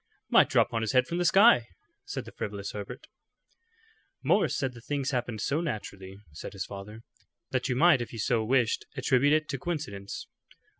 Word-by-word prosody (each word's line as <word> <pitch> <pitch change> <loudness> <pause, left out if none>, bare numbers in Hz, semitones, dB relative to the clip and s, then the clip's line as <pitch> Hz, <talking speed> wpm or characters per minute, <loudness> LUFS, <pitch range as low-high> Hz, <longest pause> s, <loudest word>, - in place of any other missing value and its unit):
"Might - - +6
drop - - +2
on 115 - 0
his 110 -1 -1
head 130 0 +4
from 170 +4 -3
the 175 - +1
sky," 190 - +6 0.4
said - - -5
the - - -10
frivolous 100 -1 -5
Herbert. 105 +6 -7 1.2
"Morris - - +2
said 135 -2 -2
the 120 - -12
things 140 +2 -2
happened 120 -4 -2
so 150 +4 0
naturally," 100 - -6
said 75 - -8
his 95 -1 -4
father, 105 +3 -9 0.5
"that 130 0 -1
you 125 - +1
might 155 -1 +5
if 120 - -5
you 115 - -8
so 110 +1 +1
wished 120 0 +1
attribute 130 +2 +3
it 155 0 +2
to 135 - -3
coincidence." 145 - -5
125 Hz, 185 wpm, -28 LUFS, 105-145 Hz, 1.2 s, Might